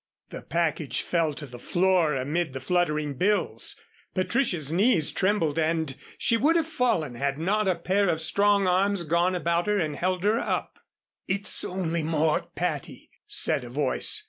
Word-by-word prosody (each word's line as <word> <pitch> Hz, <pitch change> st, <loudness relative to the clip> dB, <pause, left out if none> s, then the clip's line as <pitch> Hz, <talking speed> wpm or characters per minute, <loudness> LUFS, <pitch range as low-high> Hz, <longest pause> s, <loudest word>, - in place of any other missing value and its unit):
The -, -, -7 dB
package 160 Hz, -3 st, -1 dB
fell 165 Hz, -4 st, 0 dB
to 145 Hz, -, -7 dB
the 125 Hz, -3 st, -11 dB
floor 175 Hz, -1 st, +2 dB
amid 145 Hz, +3 st, -2 dB
the 135 Hz, -, -4 dB
fluttering 150 Hz, -1 st, 0 dB
bills. 205 Hz, +9 st, 0 dB, 0.4 s
Patricia's 185 Hz, -, 0 dB
knees 180 Hz, -3 st, +2 dB
trembled 185 Hz, -6 st, 0 dB
and 160 Hz, -3 st, 0 dB, 0.2 s
she 230 Hz, -, +2 dB
would 300 Hz, +8 st, +3 dB
have 330 Hz, -2 st, +2 dB
fallen 240 Hz, -, 0 dB
had 135 Hz, +3 st, -2 dB
not 200 Hz, +6 st, 0 dB
a 185 Hz, -, +2 dB
pair 190 Hz, +3 st, +1 dB
of 160 Hz, -, 0 dB
strong 200 Hz, +4 st, +3 dB
arms 190 Hz, +1 st, +2 dB
gone 170 Hz, +3 st, +1 dB
about 170 Hz, +1 st, 0 dB
her 210 Hz, 0 st, +2 dB
and 155 Hz, -6 st, -1 dB
held 185 Hz, +3 st, -1 dB
her 215 Hz, +3 st, +2 dB
up. -, -, -3 dB, 0.5 s
"It's 200 Hz, +2 st, +1 dB
only 170 Hz, -3 st, -2 dB
Mort, 155 Hz, 0 st, 0 dB
Patty," -, -, -4 dB, 0.2 s
said -, -, +2 dB
a 120 Hz, -, -8 dB
voice. 135 Hz, +1 st, +2 dB
170 Hz, 165 wpm, -26 LUFS, 155-195 Hz, 0.5 s, would